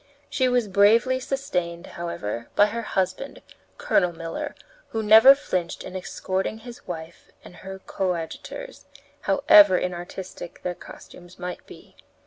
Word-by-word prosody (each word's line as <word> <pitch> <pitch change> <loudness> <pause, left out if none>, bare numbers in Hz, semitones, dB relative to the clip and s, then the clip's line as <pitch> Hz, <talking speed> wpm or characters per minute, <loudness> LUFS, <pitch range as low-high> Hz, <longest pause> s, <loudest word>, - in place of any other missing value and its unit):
She 260 - +2
was 245 -3 +1
bravely 220 +7 +4
sustained, 180 -11 -3
however, 115 -10 -5
by 205 - +6
her 225 +3 -3
husband, 190 +4 -3 0.3
Colonel 200 - +2
Miller, 165 0 -6 0.3
who 220 -1 -3
never 220 +6 +9
flinched 180 -10 -3
in 185 - -9
escorting 190 +2 -3
his 240 +2 -12
wife 165 -1 -8
and 175 - -14
her 190 0 -8
coadjutors, 190 - -5 0.3
however 205 -9 +6
inartistic 180 0 -7
their 180 - -2
costumes 175 0 -14
might 180 0 -6
be. - - -15
190 Hz, 125 wpm, -24 LUFS, 175-230 Hz, 0.3 s, never